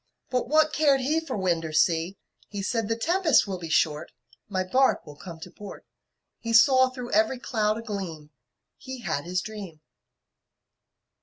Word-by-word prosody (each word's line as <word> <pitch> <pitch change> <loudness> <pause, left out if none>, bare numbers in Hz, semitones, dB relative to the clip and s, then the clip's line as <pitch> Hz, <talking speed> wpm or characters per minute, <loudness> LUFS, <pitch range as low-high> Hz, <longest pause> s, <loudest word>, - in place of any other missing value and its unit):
But 250 -1 -1
what 310 0 +3
cared 285 -3 +3
he 300 +5 +1
For 320 -8 -5
wind 175 -4 0
or 160 - -5
sea! 165 +3 +1 0.3
He 200 -1 -6
said, 225 +1 -1
"The 225 - +1
tempest 330 +3 +3
will 190 -3 -5
be 165 -2 -7
short, 155 0 +1 0.4
My 185 -2 -1
bark 260 +8 +2
will 150 -2 -11
come 165 +1 -10
to - - -9
port." 205 -1 -11 0.5
He 230 0 -4
saw 260 +2 +6
through 250 -1 -8
every 220 +5 +2
cloud 215 -4 -1
a 230 - -7
gleam 175 -9 -6 0.5
He 260 -1 -8
had 155 -8 -3
his 180 +1 -1
dream. 200 -6 -8
215 Hz, 170 wpm, -26 LUFS, 175-255 Hz, 0.5 s, saw